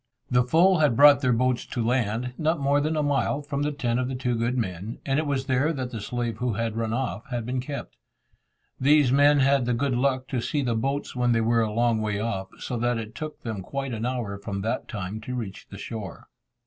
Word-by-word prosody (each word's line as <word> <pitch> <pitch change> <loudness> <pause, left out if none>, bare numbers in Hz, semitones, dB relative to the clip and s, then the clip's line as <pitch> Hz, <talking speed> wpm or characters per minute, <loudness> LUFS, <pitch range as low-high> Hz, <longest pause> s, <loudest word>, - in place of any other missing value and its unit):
The 125 0 +4
foe 170 +8 +4
had 150 -7 +3
brought 145 0 +8
their 130 -3 +2
boats 125 +1 +1
to 120 -2 -2
land, 120 0 0
not 160 +2 0
more 140 +1 +2
than 155 +2 0
a 150 - +1
mile 145 0 0
from 140 -1 -3
the 150 +1 0
tent 125 -4 -1
of 130 - -1
the 130 - -3
two 125 -1 -1
good 120 +2 0
men, 100 -1 -3
and 135 +1 +1
it 155 - -1
was 135 -2 -1
there 135 +3 +2
that 130 -4 -4
the 115 -4 -5
slave 120 +1 -3
who 125 0 -1
had 115 +1 -2
run 115 -1 -1
off 120 -4 -3
had 120 -3 -3
been 125 +2 -2
kept. 140 +2 -7 0.8
These 145 -1 +4
men 145 +1 +5
had 135 -1 +3
the 125 - +1
good 135 +2 0
luck 130 +1 0
to 125 -3 -1
see 145 +4 -1
the 120 -2 0
boats 135 +6 -2
when 120 -1 +2
they 115 - +2
were 115 +1 +3
a 110 -1 0
long 115 0 +1
way 105 -1 -1
off, 100 -4 -2
so 125 - -4
that 120 +1 0
it 110 -1 -6
took 155 +4 -7
them 110 -4 -4
quite 135 +5 -4
an 115 +2 -2
hour 115 -6 -3
from 100 -1 -4
that 110 +3 -2
time 105 0 -5
to 125 +3 -5
reach 105 -6 -6
the 100 - -9
shore. 105 -1 -7
125 Hz, 240 wpm, -26 LUFS, 115-140 Hz, 0.8 s, brought